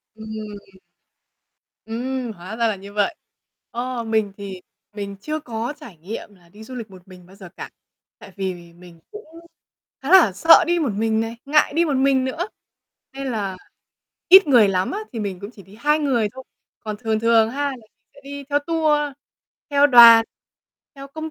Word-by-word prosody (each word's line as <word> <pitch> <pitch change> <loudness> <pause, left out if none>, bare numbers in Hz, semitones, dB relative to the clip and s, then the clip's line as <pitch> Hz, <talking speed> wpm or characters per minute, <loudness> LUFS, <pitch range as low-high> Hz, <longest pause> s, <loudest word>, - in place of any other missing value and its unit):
Ừm. 215 -3 -10 1.1
Ừm, 245 +2 -4
hóa 190 +1 -9
ra 235 -1 +1
là 215 - -1
như 200 +1 -12
vậy. 210 +11 0 0.6
Ờ, 245 0 -4
mình 220 -2 -1
thì 195 -3 -8 0.3
mình 200 -1 -6
chưa 310 +5 -4
có 240 -2 -5
trải 235 - -13
nghiệm 205 +5 -9
là 175 -2 -24
đi 210 +5 -14
du 255 +3 -10
lịch 230 -3 -7
một 185 -1 -16
mình 180 -1 -15
bao 185 +2 -18
giờ 190 -3 -12
cả. - - -7 0.5
Tại 195 - -13
vì 180 -3 -6
mình 175 -1 -16
cũng 425 +1 -11 0.8
khá 270 - -4
là 360 - +7
sợ 325 - +6
đi 345 +1 +1
một 290 -9 -1
mình 220 +2 0
này, 225 +1 -4
ngại 300 +2 +2
đi 340 - +3
một 295 -5 -1
mình 265 0 +2
nữa. 320 +9 -3 0.6
Nên 275 0 -6
là 200 -5 -3 0.7
ít 380 0 +9
người 240 -7 +5
lắm 185 -1 0
á 405 - -4
thì 235 - -6
mình 195 -3 -5
cũng 200 - -8
chỉ 215 -4 -15
đi 195 +3 -17
2 300 +3 +2
người 255 -8 0
thôi. 260 0 -10 0.4
Còn 215 -2 -6
thường 220 0 -2
thường 225 -1 +3
ha 285 +4 -3
là 285 - 0
mình 240 - -17 0.3
sẽ 280 - -17
đi 280 0 -8
theo 290 - +3
tour, 315 -1 +1 0.7
theo 285 0 +5
đoàn, 235 -4 +9 0.7
theo 275 0 -11
công 315 +3 -7
225 Hz, 190 wpm, -21 LUFS, 200-275 Hz, 1.1 s, ít